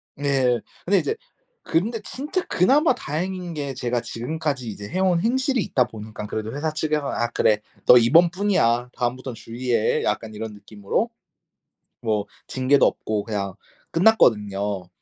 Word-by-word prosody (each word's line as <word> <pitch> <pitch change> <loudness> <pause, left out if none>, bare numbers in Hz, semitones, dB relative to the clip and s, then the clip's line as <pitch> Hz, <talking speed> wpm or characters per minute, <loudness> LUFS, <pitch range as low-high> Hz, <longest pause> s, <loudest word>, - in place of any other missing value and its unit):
네. 135 -4 +2 0.3
근데 200 +3 +4
이제 440 - -1 0.5
근데 215 +8 0
진짜 300 +8 -3
그나마 270 - +4
다행인 175 +3 -4
게 140 -3 -4
제가 120 -2 -1
지금까지 130 +2 -3
이제 100 -1 -7
해온 185 -1 +2
행실이 260 +2 +1
있다 125 -2 +2
보니깐 110 -2 -8
그래도 110 +2 -4
회사 155 +1 -2
측에서는 155 -2 -1
"아 120 - +1
그래 105 -1 +2 0.3
너 125 - +9
이번뿐이야. 160 - +3
다음부턴 125 0 -2
주의해." 115 -1 -1
약간 110 -1 -2
이런 110 0 -6
느낌으로. 105 - -2 1.0
뭐 105 -2 0 0.2
징계도 130 +2 +3
없고 105 -1 0
그냥 100 -4 -3 0.4
끝났거든요. 105 - +2
130 Hz, 320 characters per minute, -23 LUFS, 110-175 Hz, 1.0 s, 너